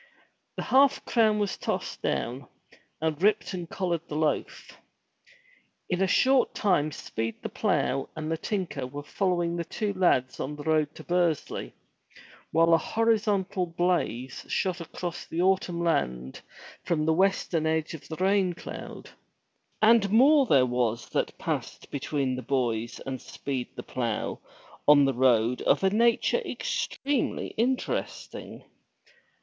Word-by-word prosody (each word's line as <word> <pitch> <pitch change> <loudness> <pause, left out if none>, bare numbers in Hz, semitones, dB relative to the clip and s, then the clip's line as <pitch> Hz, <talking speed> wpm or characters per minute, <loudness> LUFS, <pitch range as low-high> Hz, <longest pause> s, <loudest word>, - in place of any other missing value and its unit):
The - - -3
half 275 +1 +4
crown 220 -3 +3
was 205 -2 -1
tossed - - -3
down, 125 +2 -2 0.5
and 160 0 -1
Ripton 195 -4 +1
collared 175 -2 -2
the 150 - -6
loaf. 155 0 -2 1.2
In 180 +1 0
a 195 - +3
short 260 +7 +3
time 175 -7 +2
Speed 115 -4 -5
the - - -3
Plough 135 - 0
and 155 0 -4
the 165 - 0
tinker 165 -11 -3
were 145 +3 -7
follow 180 +2 0
ing 170 0 -1
the 170 - -1
two 205 +4 -3
lads 175 -9 +2
on 150 +3 -3
the 145 - -8
road 155 -1 +1
to - - -10
Bursley, 175 -4 -1 0.8
while 165 +1 +4
a 165 - +6
horizontal 205 -3 +1
blaze 165 -8 -1
shot 185 -2 -1
across 170 +1 -6
the 170 +2 -1
autumn 185 -2 +1
land 65 - -1 0.4
from 155 -3 0
the 160 - +3
western 180 -3 +1
edge 160 0 0
of 160 - -9
the 160 - -5
rain 190 0 +2
cloud. - - -9 0.7
And 220 -2 +6
more 270 +6 +5
there 135 -7 +5
was 120 -2 -1
that - - -2
passed - - -4
between 140 -2 -1
the 130 - -5
boys 120 -4 -1
and 130 -2 -5
Speed 130 -3 -4
the - - -6
Plough 115 -4 -3 0.5
on 145 -1 +7
the 135 - +1
road 125 -1 +3
of - - +2
a 190 - +4
nature 235 - +3
extremely 280 -2 -2
interesting. 250 +3 -3
165 Hz, 145 wpm, -27 LUFS, 135-195 Hz, 1.2 s, on